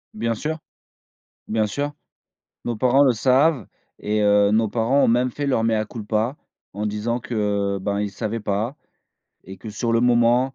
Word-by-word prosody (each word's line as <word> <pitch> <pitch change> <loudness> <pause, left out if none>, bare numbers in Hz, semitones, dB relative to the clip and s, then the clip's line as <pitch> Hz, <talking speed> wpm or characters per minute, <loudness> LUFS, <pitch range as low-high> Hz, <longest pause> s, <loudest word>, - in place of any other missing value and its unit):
Bien 115 +1 -1
sûr, 155 +7 -4 0.9
bien 110 0 +1
sûr, 145 +8 -3 0.7
nos 120 - -1
parents 130 +5 +4
le 130 -3 +4
savent 130 - +2 0.3
et 105 +1 -1
heu, 105 0 +4
nos 110 +1 +3
parents 120 +6 +2
ont - - +4
même 125 +2 +2
fait 145 +2 -3
leur 130 -5 +1
mea 110 -1 +1
culpa, 110 +3 -2 0.4
en 105 +2 -3
disant 105 +3 -2
que, 100 -4 -1
ben, 100 +1 -1
ils 105 -1 -3
savaient 110 +2 -4
pas 105 +6 -2 0.7
et 95 +1 -10
que 110 +4 -10
sur 115 +2 -2
le 115 - +3
moment 120 +2 +3
115 Hz, 170 wpm, -22 LUFS, 105-125 Hz, 0.9 s, parents